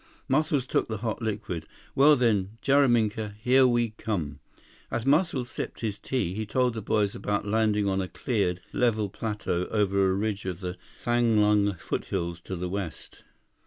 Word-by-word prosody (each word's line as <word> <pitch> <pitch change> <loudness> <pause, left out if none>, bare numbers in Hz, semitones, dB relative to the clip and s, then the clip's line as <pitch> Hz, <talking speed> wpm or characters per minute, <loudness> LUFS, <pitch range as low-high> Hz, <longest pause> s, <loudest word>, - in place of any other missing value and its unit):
Muscles 145 -1 +1
took - - 0
the 110 - -3
hot 110 +1 -2
liquid. 100 -7 -3 0.3
"Well 145 +2 +6
then, 110 -5 +1
Jaraminka, 115 -7 +2
here 130 +3 +5
we 120 -2 +1
come." 85 -10 -4 0.5
As 115 +1 -2
Muscles 140 -4 +2
sipped - - -5
his 105 -3 -2
tea, 105 -10 -1
he 110 +3 -3
told 125 +3 +1
the 110 - -4
boys 105 0 +1
about 105 0 -2
landing 105 -1 +1
on 95 0 +1
a 95 - -3
cleared, 95 -6 -1
level 110 -4 +1
plateau 105 -5 -2
over 100 -2 +2
a - - +2
ridge 100 0 -2
of 90 -2 -3
the 90 -1 -4 0.3
Thanglung 105 -4 +3
foothills 85 0 -3
to 95 - -4
the 90 +1 -3
west. 95 -3 -6
105 Hz, 160 wpm, -27 LUFS, 95-120 Hz, 0.5 s, Well